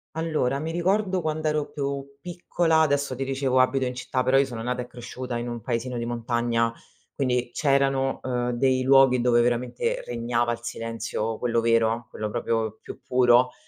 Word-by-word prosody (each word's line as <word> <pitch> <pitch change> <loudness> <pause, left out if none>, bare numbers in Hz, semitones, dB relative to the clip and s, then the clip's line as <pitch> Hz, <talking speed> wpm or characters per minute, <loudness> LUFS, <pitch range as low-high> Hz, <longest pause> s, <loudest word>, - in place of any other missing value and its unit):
Allora, 155 -5 0
mi 160 +2 -3
ricordo 185 +2 +1
quand'ero 155 -1 -1
più 140 -1 -3 0.2
piccola 170 -1 +1
adesso 140 -3 +1
ti 135 - -3
dicevo 135 -1 0
abito 130 +1 +2
in 125 0 -3
città, 130 0 -2
però 130 +1 +3
io 140 - +4
sono 120 -4 -6
nata 125 +1 -2
e 125 - -12
cresciuta 125 0 -6
in 120 - -4
un 120 - -5
paesino 120 0 -3
di 115 - -3
montagna, 120 -1 0 0.4
quindi 125 -3 0
c'erano, 135 -1 +1
ehm, 125 -1 -1
dei 130 +1 +1
luoghi 135 -1 +5
dove 120 -1 +4
veramente 120 +1 -1
regnava 120 0 -1
il 120 - -3
silenzio 115 -1 -4
quello 115 -1 +1
vero, 115 0 +2
quello 105 0 -4
proprio 110 -1 -2
più - - -10
puro 125 0 +4
125 Hz, 170 wpm, -25 LUFS, 120-135 Hz, 0.4 s, luoghi